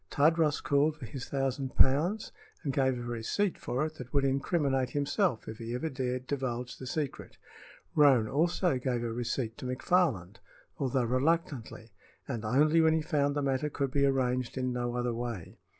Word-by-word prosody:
Tadros 155 Hz, 0 st, +2 dB
called 145 Hz, +2 st, +2 dB
for 140 Hz, -, -8 dB
his 125 Hz, +3 st, -7 dB
thousand 135 Hz, -1 st, -2 dB
pounds 170 Hz, +11 st, +3 dB, 0.3 s
and 140 Hz, -4 st, -1 dB
gave 130 Hz, -2 st, +2 dB
a 120 Hz, -, -5 dB
receipt 120 Hz, -, -1 dB
for 130 Hz, +5 st, -1 dB
it 155 Hz, 0 st, -7 dB
that 125 Hz, -1 st, -8 dB
would 140 Hz, -1 st, +2 dB
incriminate 135 Hz, -1 st, +1 dB
himself 145 Hz, -, 0 dB
if 110 Hz, -, -7 dB
he 115 Hz, +1 st, -4 dB
ever 160 Hz, +6 st, -2 dB
dared 130 Hz, -2 st, -3 dB
divulge 125 Hz, -3 st, -3 dB
the 130 Hz, -, -7 dB
secret. 145 Hz, 0 st, -4 dB, 0.6 s
Roane 135 Hz, -7 st, +5 dB
also 165 Hz, -, +1 dB
gave 125 Hz, -2 st, -1 dB
a 115 Hz, -1 st, -2 dB
receipt 120 Hz, -1 st, -3 dB
to -, -, -7 dB
McFarland, 125 Hz, -, +1 dB, 0.4 s
although 130 Hz, -2 st, +1 dB
reluctantly, 130 Hz, -3 st, -1 dB, 0.4 s
and 120 Hz, -5 st, -4 dB
only 150 Hz, +9 st, +4 dB
when 160 Hz, 0 st, +4 dB
he 160 Hz, -, +1 dB
found 145 Hz, -3 st, +1 dB
the 145 Hz, -, 0 dB
matter 135 Hz, +2 st, 0 dB
could 140 Hz, -2 st, -2 dB
be 140 Hz, +1 st, +2 dB
arranged 130 Hz, -2 st, +1 dB
in 130 Hz, -1 st, -1 dB
no 120 Hz, 0 st, -2 dB
other 120 Hz, -1 st, -1 dB
way. 115 Hz, -6 st, -5 dB
135 Hz, 175 wpm, -30 LUFS, 125-150 Hz, 0.6 s, Roane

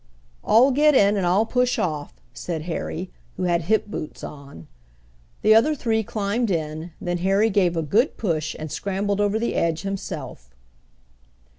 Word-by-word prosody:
"All 245 Hz, +5 st, +5 dB
get 295 Hz, +2 st, +4 dB
in, 205 Hz, -3 st, +5 dB
and 190 Hz, -3 st, 0 dB
I'll 195 Hz, +5 st, +3 dB
push 250 Hz, +1 st, +1 dB
off," 150 Hz, -, -3 dB, 0.2 s
said 165 Hz, -3 st, -5 dB
Harry, 175 Hz, +1 st, -4 dB, 0.3 s
who -, -, -3 dB
had 175 Hz, -1 st, +1 dB
hip 220 Hz, +4 st, +2 dB
boots 205 Hz, -7 st, -7 dB
on. 140 Hz, -, -10 dB, 0.8 s
The 215 Hz, -, +6 dB
other 240 Hz, +8 st, +4 dB
three 225 Hz, -5 st, 0 dB
climbed 215 Hz, +2 st, -2 dB
in, 160 Hz, -1 st, -3 dB
then 175 Hz, 0 st, -2 dB
Harry 195 Hz, +5 st, +2 dB
gave 180 Hz, -4 st, +2 dB
a 165 Hz, -, 0 dB
good 220 Hz, -, +1 dB
push 155 Hz, -7 st, -2 dB
and 155 Hz, -1 st, -7 dB
scrambled 200 Hz, +1 st, -1 dB
over 205 Hz, +1 st, +1 dB
the 235 Hz, +1 st, -1 dB
edge 165 Hz, 0 st, 0 dB
himself. 165 Hz, -, -6 dB
195 Hz, 160 wpm, -23 LUFS, 165-220 Hz, 0.8 s, The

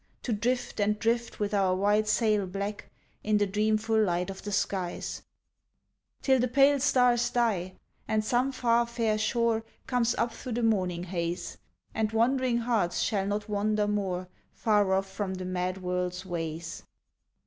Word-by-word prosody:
To 240 Hz, -, -1 dB
drift 240 Hz, +3 st, -1 dB
and 210 Hz, +1 st, +2 dB
drift 235 Hz, +2 st, -1 dB
with 205 Hz, 0 st, -1 dB
our 190 Hz, -2 st, +2 dB
white 205 Hz, +3 st, +2 dB
sail 210 Hz, -2 st, +2 dB
black 200 Hz, +2 st, -5 dB, 0.3 s
In 210 Hz, 0 st, +2 dB
the 205 Hz, -, +3 dB
dreamful 215 Hz, +2 st, +1 dB
light 180 Hz, -1 st, 0 dB
of 190 Hz, -, -9 dB
the 205 Hz, -, -5 dB
skies, 190 Hz, -3 st, -2 dB, 1.0 s
Till 265 Hz, -1 st, +4 dB
the 250 Hz, -, +2 dB
pale 275 Hz, +3 st, +4 dB
stars 250 Hz, -3 st, +3 dB
die, 200 Hz, -7 st, 0 dB, 0.3 s
and 215 Hz, 0 st, 0 dB
some 250 Hz, +4 st, +1 dB
far 235 Hz, -2 st, +2 dB
fair 230 Hz, -2 st, 0 dB
shore 225 Hz, 0 st, +1 dB, 0.2 s
Comes 245 Hz, -2 st, +1 dB
up 235 Hz, -, 0 dB
through 255 Hz, -, -6 dB
the 240 Hz, +1 st, -1 dB
morning 185 Hz, -6 st, +1 dB
haze, 175 Hz, -1 st, -4 dB, 0.3 s
And 220 Hz, -1 st, 0 dB
wandering 250 Hz, +2 st, +2 dB
hearts 230 Hz, -7 st, 0 dB
shall 200 Hz, -3 st, 0 dB
not 205 Hz, +1 st, -2 dB
wander 210 Hz, 0 st, 0 dB
more 190 Hz, -3 st, -1 dB, 0.3 s
Far 210 Hz, -4 st, +2 dB
off 190 Hz, +1 st, +1 dB
from 190 Hz, -1 st, -4 dB
the 185 Hz, 0 st, -5 dB
mad 185 Hz, +1 st, -2 dB
world's 180 Hz, 0 st, -2 dB
ways. 165 Hz, -2 st, -4 dB
210 Hz, 160 wpm, -28 LUFS, 190-235 Hz, 1.0 s, Till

